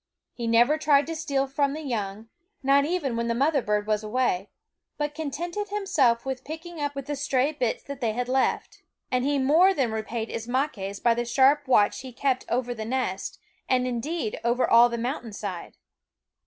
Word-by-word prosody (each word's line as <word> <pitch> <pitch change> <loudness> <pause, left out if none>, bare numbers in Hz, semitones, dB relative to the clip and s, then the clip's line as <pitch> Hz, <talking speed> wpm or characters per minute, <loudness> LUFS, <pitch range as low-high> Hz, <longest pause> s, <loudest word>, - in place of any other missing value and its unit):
He 235 -2 -4
never 240 +7 +4
tried 290 -2 +4
to 325 +2 -4
steal 285 -4 0
from 280 +1 0
the 310 +1 -6
young, 215 -4 -4 0.4
not 280 +1 +4
even 300 -7 -1
when 235 0 -1
the 230 - 0
mother 280 +3 +2
bird 210 -2 0
was 215 0 0
away, 215 -4 0 0.5
but 295 0 -2
contented 340 +7 -4
himself 310 - +1
with 265 -1 -4
picking 325 +2 -8
up 290 0 -1
the 275 +1 -4
stray 275 0 +1
bits 250 -7 -2
that 280 -2 -8
they 225 -3 0
had 245 +2 -2
left. 260 +1 0 0.3
And 250 -1 +1
he 285 +1 +1
more 320 +9 +4
than 255 -7 +1
repaid 220 +1 -3
Ismaques 225 -5 -2
by 235 - +5
the 240 +1 -1
sharp 275 +4 +3
watch 210 -5 +4
which - - -6
he 260 -1 -9
kept 255 +1 0
over 245 0 0
the 220 -2 -6
nest, 225 -5 -2 0.3
and 255 -1 +2
indeed 250 +1 -3
over 240 +2 +2
all 235 +1 +7
the 235 - -3
mountain 240 -2 -4
side. 195 -4 -6
255 Hz, 190 wpm, -26 LUFS, 235-290 Hz, 0.5 s, all